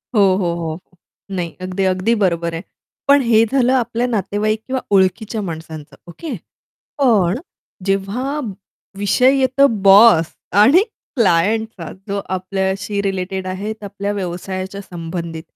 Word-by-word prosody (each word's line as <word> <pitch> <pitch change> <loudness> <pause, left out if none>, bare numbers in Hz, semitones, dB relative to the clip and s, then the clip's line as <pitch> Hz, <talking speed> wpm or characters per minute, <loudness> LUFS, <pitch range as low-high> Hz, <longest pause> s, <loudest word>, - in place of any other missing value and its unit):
हो, 205 - +5
हो, 175 -3 0
हो, 165 0 -4 0.5
नाही. 175 -3 -4
अगदी, 185 +1 -2
अगदी 195 +6 +1
बरोबर 170 -2 0
आहे. 165 - -4 0.5
पण 280 0 +6
हे 225 -2 +4
झालं 260 -1 +3
आपल्या 245 -1 0
नातेवाईक 215 0 -1
किंवा 260 0 -2
ओळखीच्या 205 +4 +1
माणसांचं 160 -4 -7
ओके. 310 - -7 0.7
पण 215 -6 +3 0.5
जेव्हा 220 +10 -1 0.6
विषय 250 +7 +3
येतो 265 +1 +4 0.2
बॉस 195 -5 +7 0.4
आणि 320 - +6 0.3
क्लायंटचा 210 -2 +1 0.2
जो 200 0 -1 0.2
आपल्याशी 190 +2 -2
रिलेटेड 190 -1 -3
आहे 195 +4 -3
आपल्या 200 0 -4
व्यवसायाच्या 190 +1 -5
संबंधित. 165 -2 -6
195 Hz, 120 wpm, -19 LUFS, 180-225 Hz, 0.7 s, बॉस